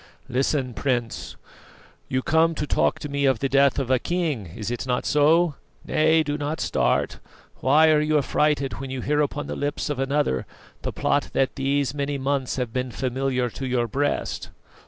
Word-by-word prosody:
Listen, 130 0 0
Prince; 120 -3 -2 0.7
you 130 0 -1
come 160 +1 +3
to 150 - -2
talk - - +1
to - - -6
me 140 0 -1
of 135 -3 +3
the 135 - -1
death 140 0 +3
of 130 -2 -1
a 130 - +4
king 160 - -2
is 110 0 -4
it 120 +2 -4
not 125 -1 0
so? 155 +3 +4 0.3
Nay 160 +1 +3
do 145 0 -3
not 150 +2 -2
start. - - 0 0.4
Why 155 +4 +5
are 150 -1 +4
you 155 0 +2
affrighted 145 -1 +1
when 135 0 -6
you 130 -1 -4
hear 150 +3 +1
upon 145 0 -2
the - - -5
lips 145 +1 -2
of 140 - -3
another 135 - 0 0.3
the - - -3
plot - - 0
that 135 - +1
these 140 0 0
many 140 0 -2
months 135 -1 -1
has 125 -3 -2
been 125 +2 -2
familiar 130 0 -1
to 135 - -5
your 125 -2 0
breast?" 145 +5 -2
140 Hz, 185 wpm, -24 LUFS, 130-150 Hz, 0.7 s, Why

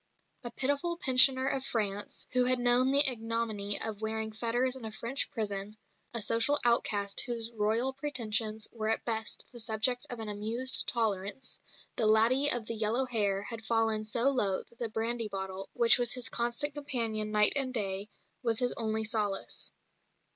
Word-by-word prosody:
A 240 - -4
pitiful 285 +7 -2
pensioner 260 -2 +5
of 270 -1 -1
France, 205 -5 -3
who 250 0 +1
had 255 0 +3
known 245 +1 +2
the 280 +1 +7
ignominy 225 -4 +1
of 215 -1 -4
wearing 220 0 -4
fetters 240 +4 -2
in 260 - -11
a 220 - -6
French 235 +5 -1
prison, 210 -3 -4 0.3
a 235 -3 0
social 230 +7 +2
outcast 205 -4 +1
whose 235 -2 -4
Royal 225 +4 -1
pretensions 225 -6 -1
were 220 -2 -4
at 225 - -1
best 225 -2 -2
the 240 - -11
subject 225 +2 -1
of 245 - -8
an 220 - -6
amused 225 +5 +3
tolerance, 215 +1 -2 0.4
the 220 - +1
"laddie 235 +6 +4
of 240 -4 +3
the 230 - -5
yellow 225 +4 0
hair" 205 -5 0
had 225 +1 -9
fallen 225 -1 -1
so 235 +5 +1
low 200 -8 0
that 235 - -27
the 235 - -3
brandy 225 +1 -3
bottle, 190 -1 -7
which 235 0 +6
was 240 -1 0
his 250 -3 -5
constant 240 +6 -2
companion 230 -7 -1
night 210 0 +7
and 270 -2 +1
day, 200 -3 0 0.3
was 230 -3 -1
his 245 +1 +1
only 220 -1 -2
solace. 210 -3 -3
230 Hz, 170 wpm, -29 LUFS, 215-250 Hz, 0.4 s, the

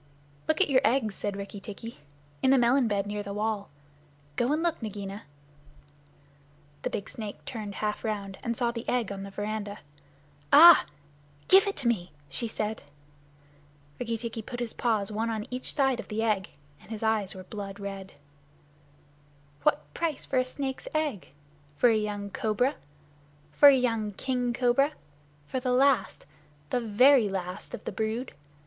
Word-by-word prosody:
"Look 315 - +1
at 390 - +4
your 260 -1 +5
eggs," 240 -5 +2
said 200 0 -3
Rikki 200 +1 -7
tikki, 215 +2 -9 0.4
"in 260 - +3
the 270 - +6
melon 245 +1 +4
bed 200 -2 0
near 205 0 -3
the 200 0 -6
wall. 210 -1 -2 0.7
Go 240 - +1
and 310 +2 +1
look, 340 -5 0
Nagaina!" 200 -2 -5 1.6
The - - -2
big 200 - -4
snake 215 -3 -8
turned 210 -5 -6
half 210 -1 -2
around, 200 -3 -3
and 235 -1 -2
saw 240 -2 +1
the 235 0 -5
egg 245 -4 0
on 195 -1 -5
the 200 - -6
veranda. 205 0 -4 0.7
"Ah 330 +4 +10
h! - - -22 0.6
Give 385 +2 +7
it 400 - -1
to 265 - -1
me," 185 -7 0 0.2
she 185 - -3
said. 220 0 -3 1.2
Rikki 230 -2 -2
tikki 230 0 -5
put 245 +3 -7
his 240 -2 -3
paws 220 -4 0
one 220 +2 -1
on 220 -2 -3
each 250 +1 -4
side 270 -3 +2
of - - -6
the 220 +1 -2
egg, 210 -4 0 0.3
and - - -18
his 220 -1 -5
eyes 220 -4 +1
were 185 - -8
blood 200 0 -7
red. 195 -1 -7 1.5
"What 145 -1 +1
price 320 -4 -2
for 260 - +1
a 255 - +1
snake's 265 0 -5
egg? 300 - -1 0.5
For 245 - +5
a 225 - +4
young 205 -1 -2
cobra? 225 +7 +1 0.8
For 285 - +8
a 275 - +6
young 225 -4 0
king 250 +2 -1
cobra? 250 +4 +2 0.5
For 260 - -3
the 250 0 -1
last 260 -4 +2 0.5
the 245 - +1
very 235 +1 +5
last 185 0 -5
of - - -12
the - - -4
brood? 220 +5 -3
220 Hz, 170 wpm, -28 LUFS, 205-250 Hz, 1.6 s, Ah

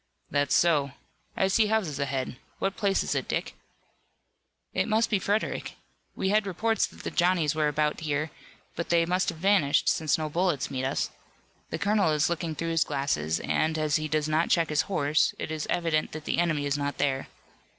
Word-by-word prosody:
"That's 145 0 +2
so. 145 -5 +3 0.4
I 190 - +3
see 210 +3 +3
houses 200 -10 0
ahead. 135 -2 -2 0.2
What 195 +1 -1
place 200 -3 +1
is - - -1
it, - - -2
Dick?" - - -2 1.2
"It - - 0
must 225 +1 +2
be 205 - +3
Frederick. 205 +3 -1 0.4
We 190 - -1
had 210 0 +2
reports 220 +4 +1
that - - -14
the - - -3
Johnnies 175 -4 +2
were 155 -1 +1
about 150 0 0
here, 150 0 -2 0.4
but 170 - -4
they 170 -1 +4
must 180 +3 +1
have 170 - -5
vanished, 165 -5 +3
since 155 -2 +2
no 155 -1 -2
bullets 155 -5 0
meet 130 -1 -2
us. 135 - -1 0.6
The - - -3
colonel 205 -3 +2
is 150 +2 +2
looking 165 -2 -2
through 165 +3 -2
his 165 -1 +3
glasses, 80 - -1
and, 160 0 0
as 155 -1 +1
he 155 0 -3
does 155 0 0
not 155 +2 +1
check 165 -2 +3
his 150 0 +2
horse, 150 -5 +2
it - - -5
is 155 -1 -3
evident 165 -3 0
that 155 0 -7
the - - 0
enemy 155 -4 +1
is 145 0 0
not 145 0 -2
there." 135 -1 0
155 Hz, 195 wpm, -27 LUFS, 145-185 Hz, 1.2 s, they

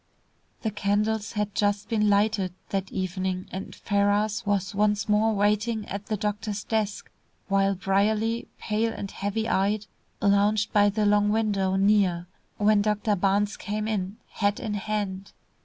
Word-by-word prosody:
The 220 - 0
candles 210 +1 0
had 210 -2 -2
just 205 0 0
been 215 -2 +2
lighted 200 -3 +1
that 195 -1 -2
evening, 185 0 -2
and 190 +1 -6
Ferrars 205 +1 +1
was 200 -1 0
once 210 0 +1
more 215 +1 +3
waiting 210 +2 +1
at 200 +1 -6
the 215 -2 -1
doctor's 210 0 -3
desk, 215 -2 -2 0.4
while 195 0 +2
Brierly, 215 +4 +1
pale 225 +2 -1
and 200 - -6
heavy 210 +3 -2
eyed, 205 +1 +1 0.3
lounged 205 +1 +2
by 205 -1 +5
the 210 +1 0
long 205 0 +3
window 205 -3 +1
near, 195 -3 +3 0.3
when 210 0 +4
Dr. 210 +1 +1
Barnes 200 +2 +1
came 215 +1 -3
in, 200 -1 -2
hat 205 0 0
in 210 - -3
hand. 200 -2 -3
205 Hz, 145 wpm, -26 LUFS, 200-215 Hz, 0.4 s, by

